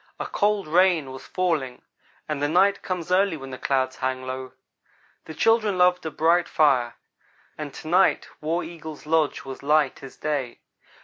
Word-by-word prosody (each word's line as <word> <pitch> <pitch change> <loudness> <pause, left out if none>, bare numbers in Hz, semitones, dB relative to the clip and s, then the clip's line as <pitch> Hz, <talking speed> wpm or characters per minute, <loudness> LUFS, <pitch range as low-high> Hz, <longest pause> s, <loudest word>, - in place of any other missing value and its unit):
A - - -3
cold 205 -3 0
rain 170 -4 +3
was 130 0 -10
falling, 160 -9 -2 0.4
and 150 -2 -3
the 145 - +2
night 195 +5 +3
comes 180 -2 -4
early 190 -2 +3
when 135 -2 -9
the 130 - -6
clouds 130 -1 0
hang 130 0 -2
low. 130 0 -6 0.7
The 160 - -9
children 220 -2 +2
loved 180 0 +3
a - - -1
bright 165 +3 +2
fire, 130 -6 +2 0.6
and 150 -2 -6
to - - -9
night 185 +4 +3
War 165 +3 -1
Eagle's 160 -3 -9
lodge 155 -2 +1
was 135 -1 -8
light 150 -1 +2
as 135 -1 -11
day. 145 -5 -3
155 Hz, 170 wpm, -24 LUFS, 135-180 Hz, 0.7 s, rain